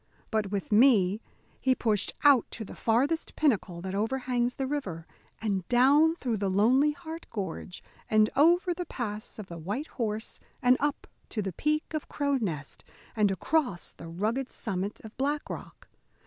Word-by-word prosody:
But 215 -3 0
with 200 0 -3
me 210 -3 +5 0.4
he 260 -1 +2
pushed 215 -5 +1
out 280 -5 +6
to 220 - -4
the - - -9
farthest 270 +8 0
pinnacle 200 - +1
that 190 +1 -5
overhangs 245 +3 0
the 270 - -2
river, 200 - -3 0.3
and 200 -4 -1
down 285 +6 +5
through 245 -9 -2
the 200 -1 0
Lonely 250 +10 +4
Heart 325 +1 -8
gorge, 190 -3 -5 0.3
and 215 0 +5
over 345 +5 +4
the 355 0 -5
pass 215 -4 -5
of 215 - -6
the 170 -2 -8
White 205 - -3 0.2
Horse, 220 0 -3 0.2
and 250 -2 +5
up 290 0 -1 0.2
to 215 - -2
the 190 -2 -3
peak 305 - -1
of 310 - -3
Cro' 285 -1 0
Nest, 155 - -4 0.3
and 210 -2 +3
across 195 - 0
the - - -11
rugged 220 +10 -2
summit 200 -1 -3
of 220 0 -11
Black 290 +3 -1
Rock. - - -9
230 Hz, 165 wpm, -29 LUFS, 200-280 Hz, 0.4 s, out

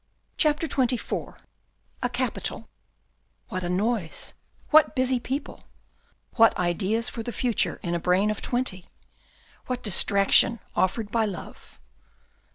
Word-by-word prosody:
CHAPTER 305 0 +1
XXIV 255 -3 -2 0.6
A - - 0
CAPITAL - - -3 0.8
What 185 -5 -4
a 175 - -3
noise, 195 -1 -2 0.4
what 310 0 +5
busy 255 -1 +1
people 270 +4 -5
I - - -29 0.7
What 225 -1 +5
ideas 190 +6 0
for 230 - -5
the 240 - -5
future 240 0 0
in 175 - -2
a 170 - 0
brain 185 +5 +2
of 215 - -5
twenty! 240 -8 -2 0.8
What 250 -1 -3
distraction 200 +3 +5 0.2
offered 205 +3 0
by 225 -1 +1
love. 190 -5 -9
225 Hz, 125 wpm, -25 LUFS, 185-250 Hz, 0.8 s, what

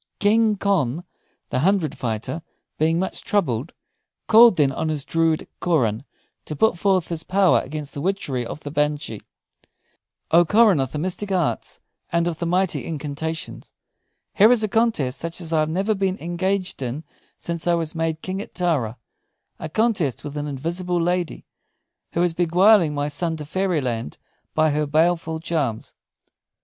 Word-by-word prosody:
King 215 +1 +3
Conn 175 -7 0 0.5
the 125 - 0
Hundred 175 -1 +1
fighter 115 +7 -3 0.4
being 160 +2 +2
much 190 +2 -3
troubled, 155 - 0 0.5
called 230 -1 +7
then 145 -4 +3
on 160 +4 -2
his 150 -3 -3
druid 165 -1 +1
Coran, 130 -8 +1 0.4
to 155 - -5
put 220 +6 +3
forth 185 -1 +1
his 165 -2 -3
power 190 0 +3
against 150 +1 -7
the 140 - -5
witchery 150 -9 -1
of 130 +6 -7
the 145 - -7
banshee: 150 -6 -1 1.1
"O 170 +2 +7
Coran 210 -1 +4
of 135 -1 -1
the - - -4
mystic 185 +5 -3
arts 180 -4 -1 0.3
and 170 0 +2
of 165 -2 -3
the 170 - -2
mighty 185 +1 0
incantations, 160 +1 -5 0.6
here 215 +4 +6
is 240 -3 +3
a - - +2
contest 210 - 0
such 165 +1 -5
as 165 -2 -5
I 160 - +3
have 155 0 +1
never 195 +6 0
been 190 -1 -1
engaged 185 0 -2
in 130 +5 -4 0.3
since 170 0 -5
I 175 - +4
was 165 -2 -3
made 160 -1 -2
King 190 +1 -3
at - - -11
Tara 145 - 0 0.6
a 160 - -5
contest 195 - 0
with 145 0 -7
an 150 0 -3
invisible 170 +6 -2
lady, 175 0 -1 0.7
who 170 - +1
is 175 -2 +1
beguiling 175 0 +4
my 145 0 -1
son 160 +2 -2
to 150 - -7
Fairyland 145 - -2 0.4
by 155 -1 +3
her 150 0 0
baleful 160 +1 +1
charms. 150 -9 -2
165 Hz, 160 wpm, -23 LUFS, 150-185 Hz, 1.1 s, called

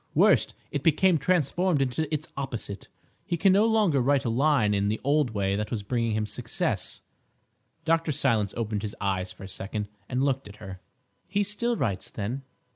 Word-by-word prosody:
Worse, - - +5 0.2
it 145 - -2
became 165 +3 +4
transformed 175 +1 +2
into 135 +4 -1
its 155 0 -2
opposite. 120 -7 -5 0.4
He 170 - -2
can 190 +2 +5
no 205 +3 +5
longer 210 - +3
write 140 +1 +2
a 115 - +1
line 125 -4 +3
in 100 0 +1
the 110 +1 0
old 145 -1 +2
way 100 -1 +1
that 105 +1 -2
was 110 -4 -3
bringing 115 +1 0
him 110 0 0
success—" - - -2 0.8
Dr. 165 -1 +2
Silence 115 -8 +1
opened 110 -3 -2
his 105 -1 -4
eyes 95 -2 -1
for - - -12
a - - -6
second 100 +2 -5 0.2
and 130 +1 0
looked 135 -4 0
at 100 - -11
her. 95 -3 -9 0.5
"He 205 +1 +1
still 225 +4 -1
writes, 100 -7 -2
then? 115 +6 -4
130 Hz, 185 wpm, -27 LUFS, 105-155 Hz, 0.8 s, Worse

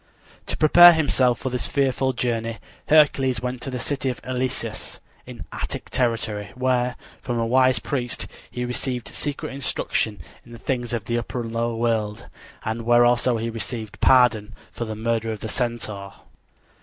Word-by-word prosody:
To - - -2
prepare 175 +3 +9
himself 130 -6 +2
for 130 - -4
this 125 -1 -1
fearful 135 -1 +1
journey 115 -2 -2 0.3
Hercules 135 -5 +4
went 125 +1 -4
to 125 - -4
the 130 - -4
city 135 +1 -2
of 125 - -4
Eleusis, 125 -3 -4 0.3
in - - -9
Attic - - -5
territory, 110 -4 -1
where, 125 -1 +1 0.3
from 120 -2 -3
a 115 - +1
wise 130 +2 +4
priest, 125 -5 -2 0.2
he 125 0 -4
received 125 0 -3
secret 145 -2 -4
instruction 115 -5 -1 0.2
in 120 - -14
the - - -9
things 120 +2 -3
of 115 -3 -3
the 120 +1 0
upper 120 +2 -4
and 115 -1 -6
lower 115 0 -1
world, 110 -2 -1 0.4
and 110 +1 -2
where 120 +1 +5
also 120 0 +3
he 115 +1 -3
received 115 -1 -5
pardon 110 -4 +4 0.2
for 120 - -4
the 110 -1 -5
murder 115 0 -1
of 110 - -6
the 110 - -4
Centaur. 110 -5 -3
120 Hz, 170 wpm, -23 LUFS, 115-130 Hz, 0.4 s, prepare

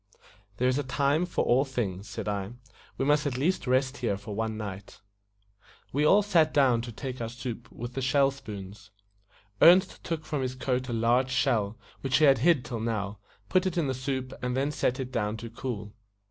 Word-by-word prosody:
"There 125 - +2
is 130 +2 +2
a - - -1
time 140 +5 +1
for 175 - -1
all 125 +3 +4
things," 110 -8 -3
said - - -5
I. 100 +1 -2 0.4
"We 135 - 0
must 150 +1 +3
at 130 -3 -2
least 165 +3 0
rest 130 +2 +1
here 115 -6 -1
for 105 +1 -8
one 110 +1 -2
night." 100 -2 -7 0.9
We 145 +3 +2
all 205 +6 +6
sat 165 -6 +3
down 130 -5 +4
to 120 0 -7
take 130 +2 -6
our 115 - -3
soup 120 -1 -7
with 120 +1 -7
the 135 - -3
shell 135 +1 +3
spoons. 105 -6 -9 0.7
Ernest 185 +3 +6
took 160 -2 -3
from 150 -3 -2
his 130 0 -2
coat 130 0 -1
a - - -2
large 120 +3 +2
shell, 115 -5 +1 0.2
which 135 -1 +1
he 155 - +5
had 135 -4 +5
hid 155 -1 +3
till 120 -3 -4
now, 105 -3 -3 0.3
put 185 - +2
it 180 - -3
in 165 - +2
the 135 - 0
soup, 130 0 -3
and 125 0 -1
then 140 +2 +1
set 130 -3 0
it 130 -1 -4
down 110 -3 -1
to 115 0 -8
cool. 110 -4 -5
130 Hz, 205 wpm, -28 LUFS, 115-140 Hz, 0.9 s, all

